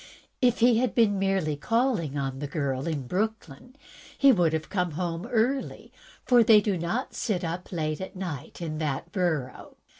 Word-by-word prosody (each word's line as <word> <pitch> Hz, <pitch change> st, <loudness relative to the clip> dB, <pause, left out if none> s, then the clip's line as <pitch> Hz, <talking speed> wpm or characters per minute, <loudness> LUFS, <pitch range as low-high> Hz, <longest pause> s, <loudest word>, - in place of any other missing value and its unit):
If 245 Hz, -2 st, +2 dB
he 235 Hz, -1 st, +5 dB
had 245 Hz, -5 st, 0 dB
been 205 Hz, -4 st, +3 dB
merely 190 Hz, -6 st, 0 dB
calling 220 Hz, -, 0 dB
on 135 Hz, -1 st, -3 dB
the 145 Hz, -, -4 dB
girl 140 Hz, -1 st, -2 dB
in 150 Hz, -5 st, -3 dB
Brooklyn, 215 Hz, -, -4 dB, 0.4 s
he 275 Hz, -1 st, +6 dB
would 175 Hz, -8 st, +3 dB
have 155 Hz, 0 st, -2 dB
been 180 Hz, -3 st, -1 dB
home 170 Hz, +1 st, -3 dB
early, 245 Hz, +4 st, -1 dB, 0.3 s
for 245 Hz, -2 st, +6 dB
they 220 Hz, -1 st, +7 dB
do 205 Hz, -1 st, 0 dB
not 175 Hz, +10 st, -3 dB
sit 200 Hz, -6 st, -2 dB
up 170 Hz, +2 st, -5 dB
late 155 Hz, -2 st, -2 dB
in 170 Hz, -3 st, -6 dB
that 155 Hz, +2 st, -3 dB
borough. 160 Hz, -9 st, -2 dB
180 Hz, 160 wpm, -27 LUFS, 155-220 Hz, 0.4 s, they